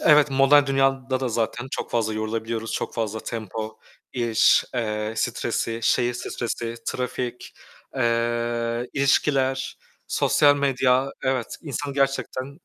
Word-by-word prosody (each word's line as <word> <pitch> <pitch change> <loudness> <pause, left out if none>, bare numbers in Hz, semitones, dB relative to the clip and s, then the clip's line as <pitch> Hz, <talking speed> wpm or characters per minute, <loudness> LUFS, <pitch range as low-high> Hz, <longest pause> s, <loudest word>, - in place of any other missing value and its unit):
Evet 150 -2 +5
modern 135 +1 +5
dünyada 135 -1 +1
da 130 - 0
zaten 120 +2 -2
çok - - -4
fazla 110 -2 0
yorulabiliyoruz, 110 +1 -3
çok - - -3
fazla 110 -1 -2
tempo, 110 0 -5 0.3
iş, 115 -3 +4
eee, 105 -2 -2
stresi, 115 0 -1
şehir 120 +2 +2
stresi, 115 -1 -4
trafik, 125 -1 -4 0.4
eee, 120 0 0
ilişkiler, 135 -1 +1 0.3
sosyal 145 -1 +4
medya, 135 -1 +2
evet, 130 -3 -1
insanı 145 -2 -4
gerçekten 135 +1 -1
125 Hz, 115 wpm, -24 LUFS, 115-135 Hz, 0.4 s, Evet